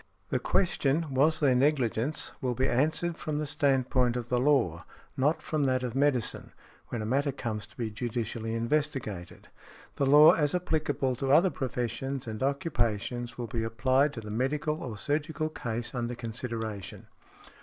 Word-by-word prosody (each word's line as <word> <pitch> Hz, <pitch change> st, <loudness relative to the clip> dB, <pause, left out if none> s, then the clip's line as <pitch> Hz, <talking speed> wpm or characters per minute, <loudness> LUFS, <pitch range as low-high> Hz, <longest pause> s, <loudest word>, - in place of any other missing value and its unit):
The -, -, +1 dB
question, 155 Hz, -4 st, +1 dB
"Was 150 Hz, +5 st, +3 dB
there 140 Hz, -4 st, +4 dB
negligence?" 135 Hz, 0 st, +1 dB
will 125 Hz, -2 st, -1 dB
be 130 Hz, +2 st, +1 dB
answered 155 Hz, +6 st, 0 dB
from 155 Hz, -1 st, -2 dB
the 150 Hz, -, -1 dB
stand 135 Hz, -3 st, +1 dB
point 125 Hz, -2 st, +2 dB
of 120 Hz, -1 st, -5 dB
the 125 Hz, -, +2 dB
law, 125 Hz, -, +2 dB, 0.3 s
not 145 Hz, +5 st, +1 dB
from 155 Hz, -3 st, 0 dB
that 130 Hz, -1 st, +1 dB
of 125 Hz, -2 st, -3 dB
medicine, 135 Hz, -3 st, 0 dB, 0.3 s
when 115 Hz, -3 st, -4 dB
a -, -, -3 dB
matter 140 Hz, +5 st, +1 dB
comes 110 Hz, -6 st, -4 dB
to -, -, -24 dB
be 115 Hz, -3 st, -3 dB
judicially 115 Hz, 0 st, -3 dB
investigated. 115 Hz, -, -2 dB, 0.5 s
The 140 Hz, -, +1 dB
law 150 Hz, +3 st, +9 dB
as 150 Hz, +1 st, +1 dB
applicable 150 Hz, -7 st, 0 dB
to 135 Hz, +1 st, -1 dB
other 175 Hz, +6 st, +5 dB
professions 130 Hz, +1 st, -3 dB
and 110 Hz, -2 st, -6 dB
occupations 120 Hz, -4 st, -1 dB
will 120 Hz, -, -3 dB
be 115 Hz, 0 st, -3 dB
applied 130 Hz, +5 st, +2 dB
to 115 Hz, -, -6 dB
the 105 Hz, -1 st, -7 dB
medical 150 Hz, +7 st, -1 dB
or 115 Hz, -5 st, -5 dB
surgical 155 Hz, +5 st, -1 dB
case 120 Hz, -5 st, -4 dB
under 120 Hz, -1 st, -2 dB
consideration. 115 Hz, -4 st, -5 dB
130 Hz, 165 wpm, -29 LUFS, 115-145 Hz, 0.5 s, law